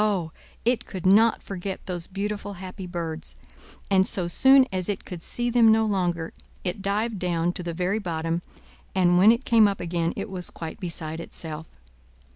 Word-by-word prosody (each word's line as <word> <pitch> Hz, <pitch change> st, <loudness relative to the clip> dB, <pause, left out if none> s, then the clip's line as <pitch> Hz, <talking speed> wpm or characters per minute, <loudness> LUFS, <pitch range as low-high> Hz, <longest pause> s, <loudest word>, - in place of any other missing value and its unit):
Oh! 190 Hz, -7 st, 0 dB, 0.3 s
it 245 Hz, 0 st, +1 dB
could 185 Hz, -3 st, -7 dB
not 215 Hz, +4 st, +5 dB
forget 190 Hz, 0 st, -5 dB
those 175 Hz, -3 st, -4 dB
beautiful, 205 Hz, +1 st, -4 dB
happy 185 Hz, 0 st, -8 dB
birds; 165 Hz, -2 st, -5 dB, 0.6 s
and 190 Hz, -1 st, +4 dB
so 180 Hz, -3 st, 0 dB
soon 265 Hz, +9 st, +6 dB
as 185 Hz, 0 st, -1 dB
it 200 Hz, -, -3 dB
could 180 Hz, -3 st, -7 dB
see 240 Hz, +6 st, -1 dB
them 230 Hz, -2 st, +6 dB
no 220 Hz, 0 st, +4 dB
longer, 175 Hz, -5 st, -1 dB, 0.3 s
it 185 Hz, +1 st, -3 dB
dived 210 Hz, +2 st, -1 dB
down 175 Hz, -1 st, 0 dB
to -, -, -3 dB
the 170 Hz, -1 st, -4 dB
very 185 Hz, +5 st, 0 dB
bottom, 165 Hz, -3 st, -2 dB, 0.5 s
and 175 Hz, -1 st, +4 dB
when 205 Hz, +4 st, +8 dB
it 235 Hz, +3 st, 0 dB
came 225 Hz, -2 st, +6 dB
up 200 Hz, -1 st, -2 dB
again, 170 Hz, -1 st, -1 dB
it -, -, -4 dB
was 180 Hz, -2 st, -4 dB
quite 165 Hz, -1 st, -7 dB
beside 165 Hz, -3 st, -4 dB
itself. 160 Hz, -1 st, -7 dB
185 Hz, 180 wpm, -25 LUFS, 170-210 Hz, 0.6 s, when